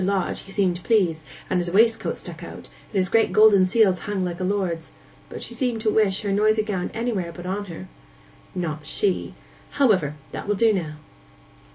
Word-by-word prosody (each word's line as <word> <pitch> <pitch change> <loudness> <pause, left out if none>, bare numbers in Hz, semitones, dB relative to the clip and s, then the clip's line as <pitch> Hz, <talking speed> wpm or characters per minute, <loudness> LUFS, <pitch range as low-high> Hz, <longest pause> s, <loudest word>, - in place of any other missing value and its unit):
Lodge, 195 -1 0
he 195 - -10
seemed 185 -3 0
pleased, 180 -9 +2 0.3
and 185 - 0
his 175 0 0
waistcoat 225 +5 +2
stuck - - -10
out, - - -10 0.2
and - - -25
his 185 -1 +2
great 225 +3 +2
golden 210 -3 +6
seals 190 -2 +3
hung 200 -2 -2
like 175 0 -4
a - - -2
lord's; 185 -4 -1 0.4
but - - -7
she - - -6
seemed 245 -4 -1
to 215 -1 +1
wish 200 -3 +2
her 200 - -1
noisy 215 +2 +3
gownd 195 -4 -3
anywhere 220 -7 -2
but 175 +2 -10
on 200 +3 -3
her.' 185 0 -9 0.7
'Not 155 -4 -4
she! 195 -3 -1 0.4
However, 190 - +2 0.2
that - - -6
will 205 - +1
do 225 +2 +3
now. 160 -6 -3
195 Hz, 190 wpm, -23 LUFS, 180-215 Hz, 0.7 s, golden